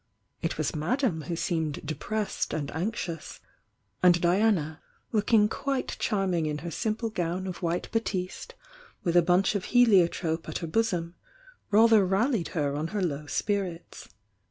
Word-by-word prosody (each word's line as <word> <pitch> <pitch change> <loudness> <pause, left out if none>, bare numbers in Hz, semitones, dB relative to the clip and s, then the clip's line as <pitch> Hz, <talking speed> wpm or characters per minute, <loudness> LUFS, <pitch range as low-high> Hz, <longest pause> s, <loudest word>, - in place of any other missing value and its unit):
It - - -2
was - - -1
Madame 185 - 0
who 170 - -2
seemed 160 -3 -2
depressed 210 +8 -2
and 145 -2 -3
anxious, 170 -2 -4 0.6
and 175 -1 +6
Diana, 175 -3 +2 0.3
looking 215 -1 +4
quite 270 +4 -2
charming 190 -7 0
in 150 -1 -2
he" 165 +4 -6
siii^ple 220 +5 -2
gown 180 +1 -2
of 185 -1 -6
white 170 0 -1
batiste 225 - -3 0.5
with 170 -1 0
a 175 - +8
bunch 180 +4 +3
of 200 -3 -2
heliotrope 180 -8 +3
at - - -2
her 170 - -4
bosom, 175 -2 0 0.6
rather 220 0 +6
rallied 195 +2 +1
her 145 -2 +1
on 155 +2 -2
her 205 +4 -3
low 150 -3 -2
spirits. 180 +1 -3
180 Hz, 145 wpm, -28 LUFS, 165-215 Hz, 0.6 s, a